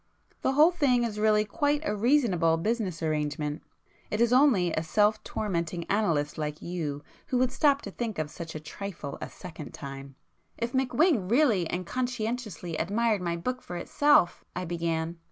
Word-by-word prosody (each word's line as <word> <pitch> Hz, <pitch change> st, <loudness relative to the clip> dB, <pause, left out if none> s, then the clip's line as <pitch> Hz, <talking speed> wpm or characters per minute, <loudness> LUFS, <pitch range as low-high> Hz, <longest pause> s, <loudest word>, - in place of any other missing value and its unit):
The 265 Hz, -, +1 dB
whole 305 Hz, +5 st, +6 dB
thing 275 Hz, -8 st, +2 dB
is 215 Hz, -3 st, -3 dB
really 215 Hz, 0 st, +3 dB
quite 290 Hz, +4 st, 0 dB
a -, -, 0 dB
reasonable 205 Hz, -, +3 dB
business 190 Hz, -3 st, -2 dB
arrangement;—it 150 Hz, +6 st, -4 dB
is 235 Hz, +1 st, +3 dB
only 245 Hz, -, +4 dB
a 155 Hz, -, 0 dB
self 210 Hz, +6 st, +2 dB
tormenting 170 Hz, -4 st, -2 dB
analyst 160 Hz, -9 st, +1 dB
like 150 Hz, 0 st, -3 dB
you 155 Hz, -5 st, -4 dB, 0.2 s
who 255 Hz, -, 0 dB
would 250 Hz, 0 st, +2 dB
stop 285 Hz, -2 st, +3 dB
to 200 Hz, -, -6 dB
think 225 Hz, -1 st, -4 dB
of 155 Hz, -1 st, -3 dB
such 165 Hz, 0 st, -8 dB
a -, -, -3 dB
trifle 155 Hz, -2 st, -7 dB
a -, -, -5 dB
second 165 Hz, -5 st, -9 dB
time." 135 Hz, -1 st, -8 dB, 0.4 s
"If 235 Hz, 0 st, -2 dB
McWhing 260 Hz, -, +2 dB
really 230 Hz, -, +3 dB
and 180 Hz, 0 st, -3 dB
conscientiously 230 Hz, -7 st, -3 dB
admired 210 Hz, +4 st, +1 dB
my 170 Hz, -1 st, -1 dB
book 255 Hz, +9 st, -3 dB
for 175 Hz, -, -6 dB
itself;" 290 Hz, +1 st, +3 dB
I 180 Hz, +1 st, -3 dB
began. 165 Hz, 0 st, -2 dB
200 Hz, 165 wpm, -28 LUFS, 165-240 Hz, 0.4 s, whole